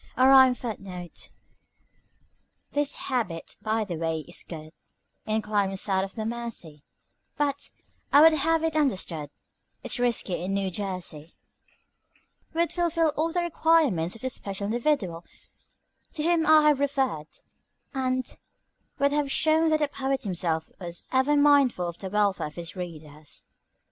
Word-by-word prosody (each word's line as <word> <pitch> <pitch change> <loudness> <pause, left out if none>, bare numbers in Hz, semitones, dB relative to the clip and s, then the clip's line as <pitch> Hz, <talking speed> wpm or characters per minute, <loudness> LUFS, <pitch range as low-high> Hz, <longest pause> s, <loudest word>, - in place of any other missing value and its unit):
A 255 +1 +5
rhymed 260 -2 +7
foot 230 -4 -5
note 180 -3 -9 1.4
"This 290 -1 +1
habit, 220 -11 -3
by 220 0 0
the 180 -5 -5
way, 165 -1 -1
is 175 +3 -4
good 155 -2 -9 0.6
In 215 0 0
climes 200 -2 0
south 190 -2 +1
of 195 - -10
the 220 - -3
Mersey; 225 -10 -5 0.6
But, 285 -1 -1 0.4
I 285 - +7
would 320 +1 +8
have 325 +2 +2
it 325 -1 0
understood, 185 - 0 0.5
It's - - -1
risky 230 -7 0
in 195 +2 -1
New 195 -1 -1
Jersey 180 -5 -5 1.2
would 335 +1 0
fulfil 335 -2 +1
all 310 +2 -1
the 350 - 0
requirements 310 - +2
of 225 - -11
the 260 - -2
special 200 -5 -5
individual 215 - 0 0.9
to 300 - -3
whom 330 -1 +2
I 310 -1 +7
have 290 -2 +2
referred, 270 - 0 0.7
and 255 -1 0 0.7
would 280 0 +2
have 290 -1 0
shown 320 +2 +3
that 310 - +3
the 295 - +3
poet 270 -1 -2
himself 170 -5 -1
was 175 -2 -7
ever 265 +3 +3
mindful 280 -10 +4
of 170 0 -7
the 190 - -5
welfare 200 -4 +1
of 150 - -12
his 170 0 -6
readers." 155 -4 -7
230 Hz, 150 wpm, -26 LUFS, 180-290 Hz, 1.4 s, would